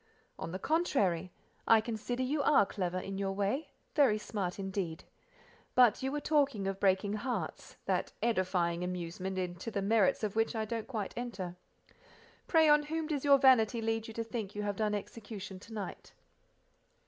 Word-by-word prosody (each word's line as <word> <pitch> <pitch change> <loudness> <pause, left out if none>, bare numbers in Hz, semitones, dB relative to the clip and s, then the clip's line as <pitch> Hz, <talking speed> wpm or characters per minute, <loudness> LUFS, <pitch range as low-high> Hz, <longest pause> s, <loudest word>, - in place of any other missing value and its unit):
"On 165 - -5
the 185 - -3
contrary, 195 - +1 0.4
I 225 - +7
consider 235 +3 -3
you 285 +3 0
are 275 -7 +5
clever, 185 -2 -3
in 195 +1 -4
your 195 -1 -1
way—very 215 +3 0
smart 200 -4 -3
indeed. 190 -4 -3 0.7
But 245 -4 +5
you 265 +1 -1
were 295 - -1
talking 280 -9 +1
of 195 0 -2
breaking 195 +1 +2
hearts—that 240 +4 -3
edifying 180 -6 +1
amusement 180 +1 -4
into 180 +3 -3
the 200 -3 -2
merits 215 0 +3
of 210 -1 -1
which 225 +1 +1
I 220 -1 -1
don't 225 0 -4
quite 220 -6 -4
enter; 195 -8 -5 0.9
pray 320 -2 +5
on 295 0 +6
whom 320 0 -1
does 300 -3 -2
your 280 -1 +7
vanity 250 -4 +5
lead 225 0 -1
you 225 - -8
to 230 - -1
think 220 -3 -5
you 210 - -2
have 205 -1 -1
done 210 -1 +1
execution 205 -2 -7
to 225 +4 -12
night?" 210 -2 -6
210 Hz, 165 wpm, -32 LUFS, 190-245 Hz, 0.9 s, I